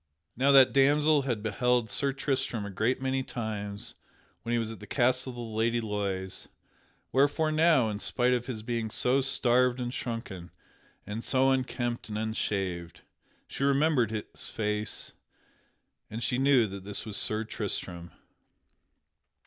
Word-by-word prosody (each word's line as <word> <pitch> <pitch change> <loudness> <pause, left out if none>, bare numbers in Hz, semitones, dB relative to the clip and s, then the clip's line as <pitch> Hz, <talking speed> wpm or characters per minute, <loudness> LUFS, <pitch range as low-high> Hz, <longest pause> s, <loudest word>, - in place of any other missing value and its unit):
Now 135 +4 +3
that 135 -2 +7
damsel 145 +2 +4
had 110 -4 -1
beheld 120 +2 +1
Sir 140 +5 -1
Tristram 135 -5 -1
a 100 - -6
great 110 +7 0
many 130 0 0
times 105 -5 -4 0.5
when 115 - -5
he 120 - +2
was 115 -1 -2
at 110 - -9
the - - -11
castle 130 0 +2
of 125 - -7
the 120 - -6
Lady 115 +1 0
Loise; 100 -4 -3 0.6
wherefore 145 +4 +2
now, 155 -6 +4
in 105 - -4
spite 125 +2 +1
of 125 0 -1
his 110 -5 -5
being 115 -1 -2
so 125 +5 +2
starved 125 -1 +2
and 120 0 -3
shrunken, 115 -9 -5 0.6
and 105 +3 -5
so 135 0 +3
unkempt 120 -3 -2
and 105 - -3
unshaved, 95 -6 -2 0.5
she - - -4
remembered 140 -3 +3
his 110 -1 -4
face 105 -1 -2 1.0
and 115 +2 -5
she 125 +2 0
knew 135 -3 +5
that 100 -2 -7
this 100 +1 -4
was 105 -2 -4
Sir 110 +2 +1
Tristram. 90 -5 -4
120 Hz, 150 wpm, -29 LUFS, 105-130 Hz, 1.0 s, that